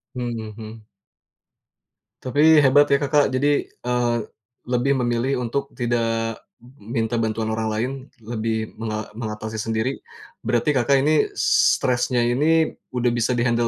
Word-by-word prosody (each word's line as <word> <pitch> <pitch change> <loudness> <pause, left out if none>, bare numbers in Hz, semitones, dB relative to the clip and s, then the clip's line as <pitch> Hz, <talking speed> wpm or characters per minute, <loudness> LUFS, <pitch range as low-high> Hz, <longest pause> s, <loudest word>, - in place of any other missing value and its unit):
Mhm 120 -2 -3 0.2
mhm. 110 0 -10 1.4
Tapi 150 +4 +5
hebat 145 +1 +5
ya 140 - +6
Kakak 145 -1 +2
jadi, 145 +2 +1
eee, 125 -1 -1 0.5
lebih 125 +3 +1
memilih 120 +2 0
untuk 140 +4 -3
tidak 115 -2 -1 0.4
minta 115 +2 -2
bantuan 110 0 -1
orang 110 0 -2
lain, 115 +5 -1 0.3
lebih 110 -1 -3
menga 110 -1 -4
mengatasi 110 -1 -5
sendiri. 115 +4 -2 0.5
Berarti 120 +5 +1
Kakak 135 +2 +3
ini 155 0 +3
stresnya 125 0 +2
ini, 155 +7 +2 0.2
udah 125 -1 +1
bisa 120 +1 0
di-handle 120 0 +1
120 Hz, 125 wpm, -22 LUFS, 115-130 Hz, 1.4 s, ya